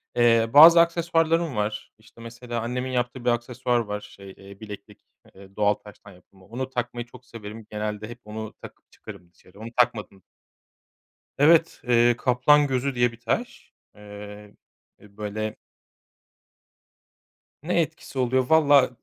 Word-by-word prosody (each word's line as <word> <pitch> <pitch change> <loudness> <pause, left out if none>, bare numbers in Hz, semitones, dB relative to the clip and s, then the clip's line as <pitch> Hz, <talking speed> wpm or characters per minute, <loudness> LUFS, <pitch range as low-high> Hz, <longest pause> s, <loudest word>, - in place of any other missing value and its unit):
eee, 115 -1 +3
bazı 165 +4 +9
aksesuarlarım 165 -2 0
var 105 0 -4
işte 110 +1 -19
mesela 120 0 -6
annemin 125 +2 -4
yaptığı 125 0 -3
bir - - +3
aksesuar 120 +1 -1
var, 105 -2 -4
şey, 100 -1 -13
eee, 100 0 -14
bileklik, 105 -1 -11 0.3
eee, 95 0 -16
doğal 105 0 +2
taştan 105 -1 -15
yapılma, 95 +1 -21
onu 125 +4 -5
takmayı 120 -1 -4
çok 125 +1 -17
severim. 110 -2 -10
Genelde 105 0 -5
hep 120 - -10
onu 110 0 -7
takıp - - -14
çıkarım 95 -5 -13
dışarı 95 +3 -21
onu 115 - -8
takmadığım 105 -6 0 1.2
Evet, 165 +3 +4
eee, 120 0 +4
kaplan 140 +4 +3
gözü 130 0 -2
diye 120 -1 +2
bir 115 - -16
taş, 235 - -4 0.2
eee, 105 0 -11 0.5
böyle 105 +1 -6 2.1
Ne 170 +1 +1
etkisi 160 -4 -6
oluyor 130 0 +1
vallahi 145 -4 +5
120 Hz, 135 wpm, -24 LUFS, 105-130 Hz, 2.1 s, bazı